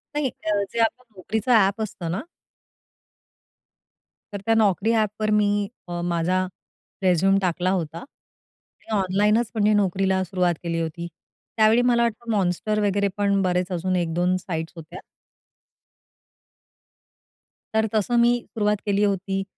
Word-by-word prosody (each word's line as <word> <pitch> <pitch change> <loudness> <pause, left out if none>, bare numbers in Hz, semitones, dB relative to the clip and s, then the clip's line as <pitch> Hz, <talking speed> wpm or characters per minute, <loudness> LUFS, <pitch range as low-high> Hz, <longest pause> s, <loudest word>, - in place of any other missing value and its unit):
नाही, 290 -3 0 0.2
अ, 205 -1 +1
जे 235 - -2
आपलं 240 +3 +1 0.2
Naukriचं 220 +6 -2
ॲप 200 +1 +2
असतं 175 -6 -4
ना 195 - -2 2.1
तर 200 - -5
त्या 225 - +3
Naukri 210 +2 +2
ॲपवर 215 0 -1
मी 205 -1 +2 0.2
अ, 175 0 -4
माझा 175 +2 0 0.6
रिझ्यूम 190 +2 +3
टाकला 180 0 0
होता 165 -4 -2
आणि 225 -3 -12
ऑनलाईनच 210 +5 +1
म्हणजे 210 0 +3
नोकरीला 190 -1 +1
सुरुवात 180 -2 0
केली 165 -1 -2
होती. 165 +1 -4 0.5
त्यावेळी 220 +2 +5
मला 240 -1 +3
वाटतं 235 0 -2
Monster 205 +3 0
वगैरे 200 0 +1
पण 200 -1 +2
बरेच 180 0 0
अजून 185 +1 -1
1-2 175 +1 +1
साइट्स 165 -3 -5
होत्या. 160 -1 -10 2.7
तर 220 0 +2
तसं 215 +3 +1
मी 240 +1 +4 0.2
सुरुवात 210 -2 +1
केली 205 0 +1
होती 195 -1 0
195 Hz, 130 wpm, -23 LUFS, 180-215 Hz, 2.7 s, त्यावेळी